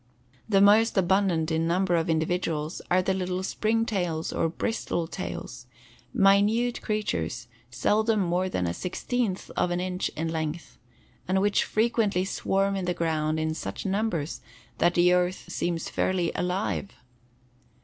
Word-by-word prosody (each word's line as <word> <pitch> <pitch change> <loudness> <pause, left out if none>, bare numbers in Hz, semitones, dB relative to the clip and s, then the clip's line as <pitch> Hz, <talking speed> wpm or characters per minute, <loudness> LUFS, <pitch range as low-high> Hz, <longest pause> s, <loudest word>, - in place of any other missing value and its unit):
The 195 -2 +4
most 215 +2 +5
abundant 180 -3 +2
in 160 +1 +1
numbers 175 0 +2
of 165 - -5
individuals 160 -1 -1
are 185 +1 +3
the 190 - +1
little 185 0 -2
spring 225 +3 0
tails 175 -7 -2
or 165 - +1
bristle 170 -2 -2
tails, 125 -8 -6 0.4
minute 205 +5 +3
creatures 120 - -2 0.2
seldom 215 - +1
more 180 0 0
than 90 - -1
a 85 - -1
sixteenth 195 - -2
of - - +1
an 175 0 -1
inch 180 0 -2
in 160 +1 -2
length 160 0 -4 0.5
and 190 +1 +2
which 205 +1 +2
frequently 215 -4 +1
swarm 195 0 0
in 190 -2 -2
the 180 0 -1
ground 155 -1 0
in 155 0 -1
such 95 -11 -6
numbers 195 -6 -1 0.4
that 175 - +3
the 180 +1 +5
earth 180 +1 0
seems 170 -2 -2
fairly 180 -3 0
alive. 185 +2 -2
180 Hz, 145 wpm, -27 LUFS, 165-200 Hz, 0.5 s, most